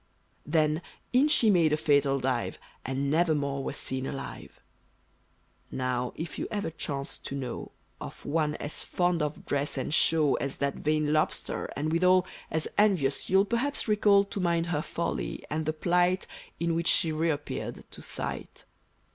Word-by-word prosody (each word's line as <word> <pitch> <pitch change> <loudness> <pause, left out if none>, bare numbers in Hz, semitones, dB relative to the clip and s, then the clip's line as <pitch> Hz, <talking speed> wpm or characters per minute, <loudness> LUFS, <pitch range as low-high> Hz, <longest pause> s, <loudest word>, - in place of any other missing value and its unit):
Then, 155 0 +2 0.3
in 260 +4 +5
she 240 -8 +5
made 170 -5 +4
a 150 - +3
fatal 140 -3 +3
dive, 130 -2 -1 0.3
And 135 +2 -1
never 160 0 +3
more 140 -1 -2
was - - -3
seen 130 0 -2
alive! 135 - -7 1.1
Now, 125 -1 -1
if 165 +1 -6
you - - -2
ever 205 -6 -2
chance 140 -3 -4
to 140 - -6
know, 130 -3 -5 0.3
Of - - -9
one 150 -1 0
as 145 - -3
fond 175 -2 +1
of 150 0 -3
dress 145 0 -1
and 130 - -2
show 155 -3 +4
As 140 - -3
that 140 0 -1
vain 155 0 +1
Lobster, 155 - 0
and 150 +3 -1
withal 180 +2 +4 0.2
As 160 0 -1
envious 180 -10 +2
you'll 190 +1 +5
perhaps 240 +6 -1
recall 205 -2 +5
To 200 - -5
mind 170 -2 +1
her 165 -4 -1
folly, 170 +1 -3
and 155 0 -1
the - - +3
plight 175 +3 +2 0.3
In 170 0 +1
which 170 +1 0
she 165 - +4
reappeared 155 -2 -2
to - - -11
sight. - - -5
155 Hz, 165 wpm, -28 LUFS, 140-175 Hz, 1.1 s, in